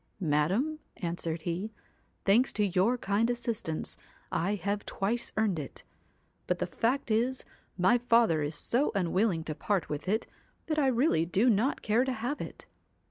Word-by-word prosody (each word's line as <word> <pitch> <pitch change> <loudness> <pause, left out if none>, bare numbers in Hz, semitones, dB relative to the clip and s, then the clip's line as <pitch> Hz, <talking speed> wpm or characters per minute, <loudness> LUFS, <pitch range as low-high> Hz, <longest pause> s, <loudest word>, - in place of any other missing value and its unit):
'Madam,' 190 - +1 0.2
answered 170 -2 -3
he, 180 +6 -3 0.5
'thanks 230 +7 +4
to 210 - +2
your 195 +6 +2
kind 215 +1 +1
assistance 235 -9 -3 0.3
I 195 +5 0
have 205 +1 -2
twice 225 +5 -2
earned 210 -6 +2
it. 140 - -6 0.6
But 180 - +1
the 180 - -1
fact 235 +8 -1
is 245 +4 +1 0.3
my 215 +7 +4
father 230 -9 +4
is 145 +1 -2
so 250 - +1
unwilling 185 -1 +1
to 155 - -3
part 185 +5 -1
with 150 +5 -4
it 220 +3 +1 0.4
that 310 -1 0
I 280 - +3
really 240 - +2
do 210 +8 +3
not 225 +7 +1
care 225 +3 +3
to 260 -1 -1
have 250 +5 -3
it.' - - -8
205 Hz, 160 wpm, -30 LUFS, 175-240 Hz, 0.6 s, thanks